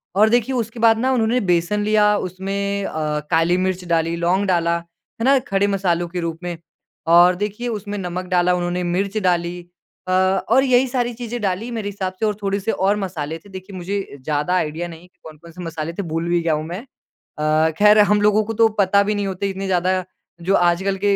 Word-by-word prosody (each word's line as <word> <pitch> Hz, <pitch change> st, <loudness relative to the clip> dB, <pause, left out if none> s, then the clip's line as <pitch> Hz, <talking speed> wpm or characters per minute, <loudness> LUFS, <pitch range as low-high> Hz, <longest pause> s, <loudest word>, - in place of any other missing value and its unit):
और 215 Hz, +2 st, +5 dB
देखिए 240 Hz, +2 st, +1 dB
उसके 230 Hz, 0 st, -3 dB
बाद 225 Hz, -1 st, +5 dB
ना 260 Hz, +2 st, +1 dB
उन्होंने 235 Hz, +1 st, +2 dB
बेसन 175 Hz, +5 st, +1 dB
लिया 210 Hz, -1 st, +3 dB
उसमें 200 Hz, +2 st, -3 dB
अ, 150 Hz, -1 st, -2 dB
काली 170 Hz, +2 st, +3 dB
मिर्च 185 Hz, -1 st, -2 dB
डाली, 165 Hz, 0 st, 0 dB
लौंग 180 Hz, +4 st, +1 dB
डाला, 170 Hz, -2 st, +2 dB
है 170 Hz, +7 st, -9 dB
ना? 275 Hz, 0 st, +5 dB
खड़े 200 Hz, -3 st, 0 dB
मसालों 175 Hz, -3 st, 0 dB
के 175 Hz, +1 st, -5 dB
रूप 165 Hz, -1 st, -4 dB
में। 175 Hz, -2 st, -4 dB, 0.5 s
और 175 Hz, +2 st, +6 dB
देखिए 210 Hz, +5 st, -4 dB
उसमें 205 Hz, -2 st, -4 dB
नमक 180 Hz, -1 st, -4 dB
डाला, 180 Hz, 0 st, +3 dB
उन्होंने 180 Hz, 0 st, -1 dB
मिर्च 200 Hz, +2 st, -1 dB
डाली 175 Hz, 0 st, 0 dB, 0.5 s
अ, -, -, -2 dB
और 190 Hz, +7 st, +3 dB
यही 255 Hz, 0 st, +3 dB
सारी 245 Hz, -1 st, -1 dB
चीज़ें 240 Hz, 0 st, -5 dB
डाली 200 Hz, +4 st, -2 dB
मेरे 215 Hz, -3 st, -3 dB
हिसाब 190 Hz, -2 st, -4 dB
से 220 Hz, -, +1 dB
और 210 Hz, -1 st, 0 dB
थोड़े-से 200 Hz, +2 st, -1 dB
और 195 Hz, +2 st, +1 dB
मसाले 165 Hz, -5 st, -4 dB
थे। 200 Hz, -, -18 dB
देखिए 190 Hz, +1 st, -9 dB
मुझे 190 Hz, -4 st, -4 dB
ज़्यादा 150 Hz, +4 st, -1 dB
आइडिया 165 Hz, 0 st, -1 dB
नहीं 165 Hz, -1 st, -11 dB
है 180 Hz, -, -17 dB
कि 185 Hz, 0 st, -41 dB
कौन-कौन 160 Hz, +2 st, -13 dB
से 180 Hz, +2 st, -10 dB
मसाले 165 Hz, 0 st, -5 dB
थे 200 Hz, -, -4 dB
भूल 165 Hz, +1 st, -3 dB
भी 175 Hz, 0 st, +2 dB
गया 165 Hz, -2 st, +1 dB
हूँ 155 Hz, 0 st, -1 dB
मैं। 175 Hz, +4 st, -5 dB, 0.6 s
अ, 155 Hz, +1 st, +2 dB
खैर 210 Hz, +1 st, +6 dB
हम 210 Hz, 0 st, +4 dB
लोगों 210 Hz, +1 st, +3 dB
को 225 Hz, -, -4 dB
तो 225 Hz, +1 st, +4 dB
पता 200 Hz, +1 st, +4 dB
भी 210 Hz, +1 st, -1 dB
नहीं 200 Hz, -1 st, -1 dB
होते 195 Hz, +1 st, -2 dB
इतने 195 Hz, 0 st, -5 dB
ज़्यादा 185 Hz, 0 st, +1 dB, 0.5 s
जो 195 Hz, -, +3 dB
आजकल 180 Hz, +3 st, +2 dB
के 205 Hz, -, +3 dB
190 Hz, 215 wpm, -20 LUFS, 170-210 Hz, 0.6 s, और